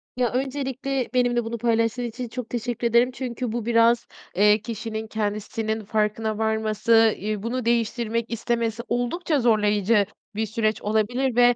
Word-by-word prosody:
Ya, 250 -2 +1
öncelikle 265 -1 -2
benimle 245 -1 +2
bunu 230 +1 -4
paylaştığın 230 +1 +1
için 240 +1 -5
çok 240 0 -6
teşekkür 240 0 -2
ederim. 235 +2 +4
Çünkü 250 -2 -4
bu 235 -1 -3
biraz, 230 0 +3 0.3
eee, 210 +2 +5
kişinin 220 -1 -5
kendisinin 215 0 -3
farkına 215 0 0
varması, 220 0 +3
iii, 210 +1 -3
bunu 245 +1 -2
değiştirmek 230 0 0
istemesi 230 0 -1
oldukça 285 +6 0
zorlayıcı 210 -2 +3 0.3
bir 220 +1 0
süreç 215 0 -1
olabilir 225 +4 0
ve, 245 0 +5
230 Hz, 140 wpm, -24 LUFS, 220-245 Hz, 0.3 s, eee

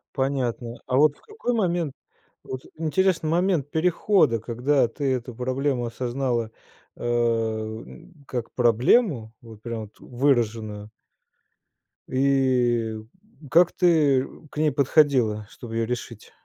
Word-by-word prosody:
Понятно. 130 -3 -2
А 130 0 +1
вот 150 0 +4
в - - -26
какой 425 - -4
момент? 175 - 0 0.5
Вот, 130 0 -6
интересный 165 +1 +1
момент 170 -4 +1
перехода, 160 - +2
когда 125 +4 +1
ты 135 +2 -1
эту 125 -1 -4
проблему 130 0 -1
осознала, 120 -1 -2 0.5
э, - - -9
м, 115 +7 -2
как 120 -3 -4
проблему, 120 - +3
вот 110 -2 -13
прям, 115 -1 -5
вот, 105 - -15
выраженную 115 -5 -1 1.2
и 125 -4 +1 0.5
как 175 +1 +5
ты 150 -7 +3 0.2
к - - -14
ней 155 -1 +2
подходила, 130 -7 +2
чтобы 115 -2 -9
её 115 0 +1
решить? 115 -2 -6
130 Hz, 115 wpm, -24 LUFS, 115-150 Hz, 1.2 s, как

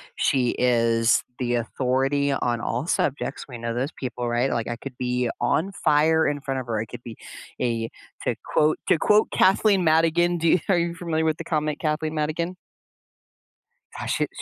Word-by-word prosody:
She 125 -3 +2
is 115 -2 +3
the 120 -1 -1
authority 135 +4 0
on 120 -3 -1
all 125 +8 -2
subjects. 140 -3 -1
We 125 - -7
know 115 0 -3
those 130 +5 -2
people, 125 -2 -4
right? 120 +3 +1
Like 115 -2 -2
I 120 - -3
could 130 +1 -9
be 125 -1 -1
on 160 +11 +1
fire 160 0 +3
in 145 0 -1
front 135 -1 -3
of 125 - -11
her. 115 -2 -1
I 110 - -2
could 115 - -10
be 115 -2 -9 0.4
a 115 -2 -1 0.3
to - - 0 0.2
quote 155 0 +3
to - - +4
quote 210 +6 +3
Kathleen 195 0 +4
Madigan 165 +2 +3
do 165 0 0
you 180 - +5
are 185 - +4
you 170 0 -1
familiar 165 -2 -1
with 160 -1 +1
the - - -6
comic 155 -2 -1
Kathleen 155 0 -1
Madigan? 155 +4 -2 1.4
Uh, - - -4
she's - - 0
140 Hz, 185 wpm, -24 LUFS, 120-160 Hz, 1.4 s, you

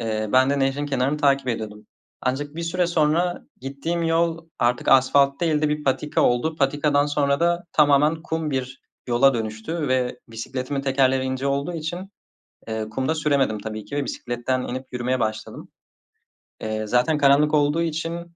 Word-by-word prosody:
Eee, 110 -2 -2
ben 130 +1 +5
de 140 - +1
nehrin 135 +2 0
kenarını 135 +1 0
takip 140 -3 +2
ediyordum. 105 -2 -5 0.3
Ancak 145 +3 -2
bir 170 - -4
süre 175 +1 0
sonra 170 +2 +1 0.2
gittiğim 140 +6 -3
yol 165 0 0
artık 120 +1 0
asfalt 140 +1 +4
değil 160 -3 +1
de 150 - +3
bir 150 0 -2
patika 145 +2 0
oldu. 140 +7 +1
Patikadan 145 +1 +2
sonra 145 0 +1
da 175 0 +1
tamamen 150 +2 +3
kum 160 -2 -3
bir 130 -1 -4 0.3
yola 125 +2 +4
dönüştü 110 +8 -3
ve 125 -1 0
bisikletimin 130 +4 -4
tekerleri 135 -1 +2
ince 130 +1 -2
olduğu 140 +4 -1
için, 175 +4 -5 0.6
eee, 110 -1 -3
kumda 130 +8 -1
süremedim 140 -8 +1
tabii 110 0 -6
ki 145 - -6
ve 145 - 0
bisikletten 125 0 -3
inip 130 +1 -5
yürümeye 125 +1 -1
başladım. 110 0 -4 0.9
Eee, 110 0 -3
zaten 125 +7 +2
karanlık 145 +1 +4
olduğu 150 +2 +2
için, 170 +1 -4
140 Hz, 160 wpm, -23 LUFS, 125-155 Hz, 0.9 s, ben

